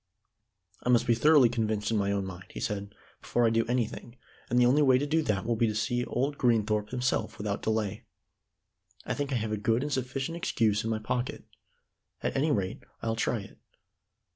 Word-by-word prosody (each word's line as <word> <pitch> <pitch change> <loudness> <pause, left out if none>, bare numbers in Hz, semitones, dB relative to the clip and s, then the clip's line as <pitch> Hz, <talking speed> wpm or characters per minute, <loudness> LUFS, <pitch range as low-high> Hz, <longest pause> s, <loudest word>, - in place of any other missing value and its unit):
"I - - -2
must 120 -1 +4
be 120 - +4
thoroughly 145 +2 +6
convinced 110 -2 -1
in 110 - +2
my 100 -1 +1
own 100 -1 -1
mind," 95 -1 -8
he - - -8
said 100 0 -4 0.3
"before 120 - +1
I 115 - +4
do 115 0 +1
anything, 120 0 -2 0.3
and 120 - +1
the 125 - +6
only 135 +5 +4
way 130 -3 +5
to 140 - 0
do 160 +2 +2
that 105 -8 -1
will 115 0 +1
be 115 +1 +2
to 110 - -2
see 120 +3 0
old 140 +3 -2
Greenthorpe 110 -3 +2
himself 125 -3 -1
without 100 -1 -3
delay. 110 -2 -1 1.0
I - - -1
think 145 -1 -3
I - - 0
have 110 -2 -1
a 110 - 0
good 115 +4 +1
and 145 0 -2
sufficient 135 +5 -2
excuse 110 -10 +1
in 115 - -2
my 110 - 0
pocket. 120 +3 -3 0.8
At - - -1
any 145 +4 +2
rate, 100 -10 -1 0.2
I'll 115 0 0
try 115 0 0
it." 100 - -14
115 Hz, 205 wpm, -29 LUFS, 105-125 Hz, 1.0 s, thoroughly